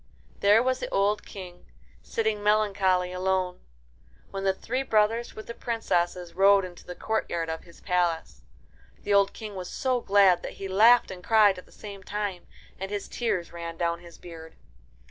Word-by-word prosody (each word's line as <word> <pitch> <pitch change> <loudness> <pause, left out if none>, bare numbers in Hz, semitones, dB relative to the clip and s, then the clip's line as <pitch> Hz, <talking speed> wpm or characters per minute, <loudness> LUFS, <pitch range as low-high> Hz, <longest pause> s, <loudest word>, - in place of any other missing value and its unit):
There 210 +3 +5
was 255 0 0
the - - -4
old 200 +2 +1
King, 180 - -10 0.3
sitting 220 -2 -1
melancholy 200 -4 +2
alone, 185 0 -1 0.7
when 195 0 -4
the 195 - +4
three 245 +7 -3
brothers 225 -1 +1
with 215 - -8
the 235 - -7
princesses 180 -7 -2
rode 195 +1 +5
into 175 -1 -11
the 180 - -7
courtyard 175 -7 -2
of 160 - -6
the 170 - -18
palace. 170 - -1 0.6
The 205 - 0
old 200 0 +4
King 215 -2 -8
was 185 -2 -6
so 255 -2 0
glad 195 -4 +4
that - - -6
he 195 - -6
laughed 225 +5 +5
and 180 -1 -9
cried 210 -3 +4
at - - -15
the - - -21
same 200 -2 -10
time, 200 -2 -4 0.3
and 195 +1 -4
his 205 -1 -4
tears 205 -9 -2
ran 170 -1 -6
down 170 -1 -1
his 170 -1 -14
beard. 160 -2 -11
195 Hz, 175 wpm, -27 LUFS, 180-210 Hz, 0.7 s, There